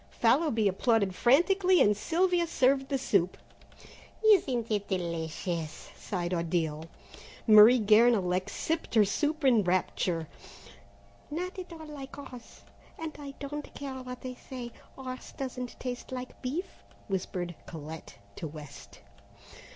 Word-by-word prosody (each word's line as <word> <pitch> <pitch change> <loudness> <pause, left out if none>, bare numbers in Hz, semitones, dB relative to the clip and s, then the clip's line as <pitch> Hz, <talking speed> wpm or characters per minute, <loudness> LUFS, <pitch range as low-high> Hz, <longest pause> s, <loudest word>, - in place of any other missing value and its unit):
Fallowby 235 -2 +2
applauded 200 0 +2
frantically, 360 - +4
and 210 0 +5
Sylvia 345 - +1
served 270 -3 +2
the 275 - +1
soup. 195 -8 +1 0.9
"Isn't 260 - +4
it 205 -1 0
delicious?" 170 -2 -3
sighed 180 -3 -3
Odile. 165 -2 -1 0.6
Marie 215 +2 +9
Guernalec 210 -4 +4
sipped 325 -5 -3
her 215 -2 +6
soup 300 +9 -1
in 235 -5 +5
rapture. 175 -2 0 1.0
"Not 360 +5 -4
at 360 -1 -8
all 320 -1 -9
like 285 -3 -9
horse, 255 -4 -11 0.4
and 320 -1 -6
I 280 -1 -8
don't 295 +1 -6
care 270 -2 -6
what 250 -1 -8
they 255 -1 -5
say, 250 -1 -8 0.2
horse 255 -1 -8
doesn't 250 -2 -5
taste 250 0 -5
like 255 0 -7
beef," 300 +9 -2 0.4
whispered 180 -2 -3
Colette 160 0 -9 0.2
to 160 - -4
West. 145 -9 -11
245 Hz, 125 wpm, -29 LUFS, 185-280 Hz, 1.0 s, Marie